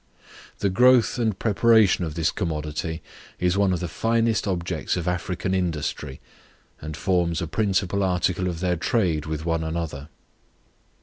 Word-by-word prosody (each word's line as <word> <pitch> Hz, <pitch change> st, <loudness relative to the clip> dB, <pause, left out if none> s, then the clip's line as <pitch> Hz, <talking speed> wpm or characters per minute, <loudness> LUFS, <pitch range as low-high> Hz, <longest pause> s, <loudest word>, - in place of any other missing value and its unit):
The 100 Hz, -, 0 dB
growth 125 Hz, +3 st, +4 dB
and 110 Hz, -5 st, 0 dB
preparation 110 Hz, -3 st, +4 dB
of 80 Hz, -3 st, -4 dB
this 80 Hz, -2 st, +1 dB
commodity 80 Hz, -2 st, -3 dB, 0.4 s
is 90 Hz, 0 st, +1 dB
one 100 Hz, -1 st, +3 dB
of 90 Hz, -, -1 dB
the 90 Hz, -, -2 dB
first 115 Hz, +5 st, 0 dB
objects 85 Hz, -3 st, -2 dB
of 85 Hz, -, -3 dB
African 90 Hz, +1 st, -2 dB
industry, 75 Hz, -6 st, -2 dB, 0.6 s
and 80 Hz, 0 st, -6 dB
forms 85 Hz, -3 st, +1 dB
a -, -, -2 dB
principal 100 Hz, +2 st, 0 dB
article 90 Hz, 0 st, 0 dB
of 85 Hz, -2 st, -4 dB
their 90 Hz, -2 st, +1 dB
trade 85 Hz, -, 0 dB
with 80 Hz, 0 st, -4 dB
one 80 Hz, -1 st, 0 dB
another. 80 Hz, -3 st, -4 dB
90 Hz, 145 wpm, -24 LUFS, 80-100 Hz, 0.6 s, growth